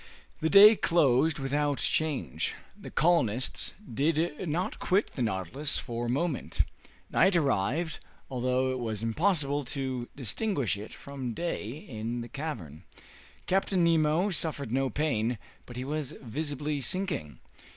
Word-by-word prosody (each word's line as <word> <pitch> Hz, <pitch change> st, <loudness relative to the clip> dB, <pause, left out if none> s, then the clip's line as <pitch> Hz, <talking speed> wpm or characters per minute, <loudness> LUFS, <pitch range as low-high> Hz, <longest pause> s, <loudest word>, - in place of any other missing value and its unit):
The 160 Hz, -, +1 dB
day 210 Hz, +4 st, +10 dB
closed 155 Hz, -4 st, +3 dB
without 145 Hz, +1 st, 0 dB
change. 145 Hz, -, -1 dB, 0.2 s
The -, -, -10 dB
colonists 130 Hz, -8 st, +1 dB, 0.2 s
did 160 Hz, -, 0 dB
not 175 Hz, +5 st, -2 dB
quit 195 Hz, +4 st, +1 dB
the 130 Hz, -, -4 dB
"Nautilus" 115 Hz, -, -1 dB
for 120 Hz, -1 st, -3 dB
a -, -, -2 dB
moment. 140 Hz, +3 st, -1 dB, 0.5 s
Night 190 Hz, 0 st, +4 dB
arrived, 150 Hz, -, +1 dB, 0.3 s
although 130 Hz, 0 st, 0 dB
it 130 Hz, -, -2 dB
was 110 Hz, -3 st, -2 dB
impossible 145 Hz, -, +1 dB
to 130 Hz, -2 st, -3 dB
distinguish 140 Hz, -, -1 dB
it 105 Hz, +2 st, -8 dB
from 130 Hz, -4 st, -6 dB
day 170 Hz, -10 st, -3 dB
in 120 Hz, -3 st, -5 dB
the 120 Hz, -, -7 dB
cavern. 95 Hz, -, -6 dB, 0.6 s
Captain 190 Hz, -1 st, +2 dB
Nemo 165 Hz, +3 st, +3 dB
suffered 150 Hz, -7 st, 0 dB
no 135 Hz, +1 st, +1 dB
pain, 125 Hz, -6 st, 0 dB, 0.3 s
but 120 Hz, -, -9 dB
he 130 Hz, -, -3 dB
was 150 Hz, -1 st, -3 dB
visibly 145 Hz, +3 st, -3 dB
sinking. 160 Hz, -, -2 dB
140 Hz, 130 wpm, -29 LUFS, 120-160 Hz, 0.6 s, day